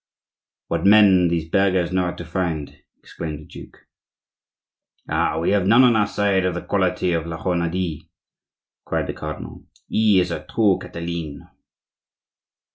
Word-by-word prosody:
"What - - -2
men 100 -3 +6
these 85 -1 -1
burghers 95 -1 +1
know 95 -1 +1
how 90 - -3
to 85 - -9
find!" 85 -4 -3 0.2
exclaimed 75 -2 -7
the - - -13
duke. - - -14 1.2
"Ah! - - 0
we 85 +3 0
have 100 -2 +1
none 120 +5 +6
on 120 -2 +5
our 105 -2 +2
side 100 -2 +1
of 90 -1 -1
the 90 - -5
quality 90 -2 0
of 80 0 -2
La 85 -1 -5
Renaudie!" 85 -2 -2 0.7
cried - - -2
the - - -4
cardinal. - - -8 0.2
"He 105 -3 +3
is 90 -1 0
a - - -4
true 105 -5 +2
Catiline." 85 -3 -6
90 Hz, 150 wpm, -22 LUFS, 85-100 Hz, 1.2 s, men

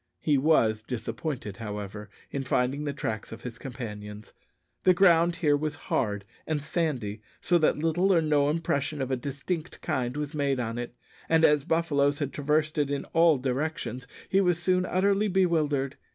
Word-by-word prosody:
He 150 - +2
was 130 -7 +3
disappointed, 115 -1 -4
however, 105 -1 -6 0.2
in 140 - -2
finding 130 +3 0
the 145 - -1
tracks 110 -6 -4
of 115 0 -9
his 120 -2 -7
companions. 105 -5 -7 0.5
The 185 -1 +5
ground 170 -2 +5
here 150 -5 +2
was 155 +1 -2
hard 105 -9 -2 0.2
and 155 -2 0
sandy, 130 - -2 0.2
so 175 -1 +2
that 155 - +3
little 165 +5 +2
or 175 - +5
no 150 -2 +2
impression 150 -2 -1
of 135 -1 -2
a - - +2
distinct 145 +6 -4
kind 130 -4 -1
was 150 0 -3
made 140 -3 0
on 115 0 -3
it; 120 0 -6 0.3
and 160 0 +5
as 150 -2 +3
buffaloes 145 -4 +2
had 145 -2 -3
traversed 150 +1 0
it 145 -1 +1
in 140 -1 -2
all 165 -2 +5
directions, 130 -2 -3 0.2
he 195 - +3
was 180 -3 +2
soon 185 +1 +1
utterly 200 +3 +2
bewildered. 155 -8 +1
145 Hz, 170 wpm, -27 LUFS, 125-160 Hz, 0.5 s, The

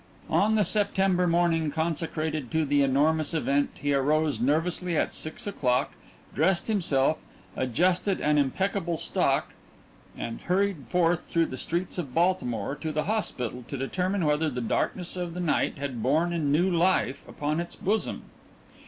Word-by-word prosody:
On 215 +2 +3
the 210 -2 +3
September 190 -2 +2
morning 165 -2 +2
consecrated 160 -2 -2
to 160 +3 +1
the 145 0 +2
enormous 150 +4 +2
event 145 -2 +1
he 145 -1 -1
arose 145 -1 +1
nervously 165 +6 0
at - - 0
six 155 - -4
o'clock, 130 -11 0 0.4
dressed 190 -2 +2
himself, 160 -9 +1 0.4
adjusted 180 - +1
an 150 0 +2
impeccable 170 +4 0
stock, - - +1 0.6
and 115 - -5
hurried 185 -4 0
forth 175 -1 +1
through 165 -1 +1
the 130 - -6
streets 175 +6 -2
of 140 -7 -5
Baltimore 150 - +1
to 160 +1 -4
the 155 0 -1
hospital, 130 - -2
to 140 - -5
determine 180 +7 -1
whether 150 +1 +2
the 125 -3 -4
darkness 170 - -1
of 175 -2 -4
the - - -4
night 170 -3 0
had 135 -4 -4
borne 160 +8 +2
in 155 -4 0
new 170 +6 +3
life 170 - +1
upon 150 +2 -2
its 170 - -5
bosom. 210 +3 -1
160 Hz, 155 wpm, -27 LUFS, 140-180 Hz, 0.6 s, On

